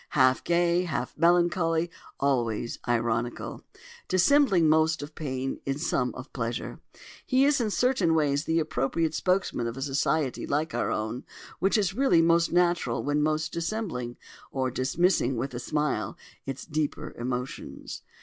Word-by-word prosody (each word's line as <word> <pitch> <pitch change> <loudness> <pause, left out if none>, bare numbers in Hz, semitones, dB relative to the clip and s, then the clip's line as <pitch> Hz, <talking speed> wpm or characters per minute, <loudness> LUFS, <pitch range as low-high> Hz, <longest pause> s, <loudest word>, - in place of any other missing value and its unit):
Half 130 -1 +4
gay, 175 +1 +2
half 125 -7 -3
melancholy, 170 0 +2 0.3
always 120 -5 0
ironical—dissembling 160 - +1
most 160 0 +3
of 150 +2 -9
pain 135 -3 -3
and 135 +1 -1
some 130 -6 0
of 130 +2 -10
pleasure—he 130 - -2
is 285 -2 +3
in 220 - 0
certain 205 -8 +2
ways 145 -1 +1
the 160 - +1
appropriate 155 +2 0
spokesman 180 -8 0
of 115 +2 -5
a - - -5
society 140 0 0
like 155 +3 -1
our - - 0
own, 110 +3 -3 0.4
which 195 +4 +3
is 195 -3 +1
really 235 -9 +4
most 170 0 +3
natural 175 -8 +1
when 145 +1 +1
most 155 0 0
dissembling, 165 - -3 0.3
or 130 -1 -1
dismissing 135 +1 +1
with 130 +3 -3
a 120 - -4
smile, 150 +2 -1 0.3
its 135 0 -5
deeper 155 -2 -3
emotions. 125 +1 -5
155 Hz, 140 wpm, -27 LUFS, 130-175 Hz, 0.4 s, Half